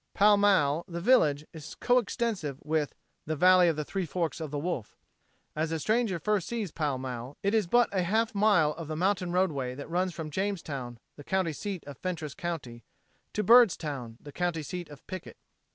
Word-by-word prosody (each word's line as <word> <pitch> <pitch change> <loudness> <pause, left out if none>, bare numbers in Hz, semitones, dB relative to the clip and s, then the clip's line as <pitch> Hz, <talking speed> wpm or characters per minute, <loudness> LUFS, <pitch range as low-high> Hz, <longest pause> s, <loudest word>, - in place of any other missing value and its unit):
Pall 205 +1 +6
Mall, 175 -7 +3
the 170 -2 -5
village, 160 - +3
is 155 -2 -9
co 245 0 +3
extensive 205 - -2
with 150 -1 -1 0.3
the 155 - -1
"Valley 180 +2 +6
of 165 - +2
the 150 0 -3
Three 190 +1 -3
Forks 170 -1 -2
o' 160 - -3
the 145 0 -4
Wolf." 145 -8 -4 0.6
As 160 +1 -1
a 160 - -1
stranger 220 +1 +1
first 210 +1 0
sees 225 -7 -3
Pall 145 -4 -1
Mall 130 +1 -6
it 200 +2 +1
is 215 -5 +2
but 240 +6 +4
a 190 -2 +1
half 220 +6 +1
mile 200 -7 +4
of 160 0 -7
the 155 - -4
mountain 185 +1 0
roadway 145 -9 0
that 145 - -7
runs 180 +2 +1
from 155 -2 -5
Jamestown, 145 -10 -3 0.2
the 145 - -10
county 185 0 0
seat 195 +2 -5
of 145 -2 -10
Fentress 165 -6 -4
county, 165 - -5 0.5
to 210 - 0
Byrdstown, 155 - +4
the 145 - -11
county 175 -1 -2
seat 175 +2 -6
of 145 -2 -13
Pickett. 185 -1 -8
170 Hz, 195 wpm, -29 LUFS, 150-195 Hz, 0.6 s, Pall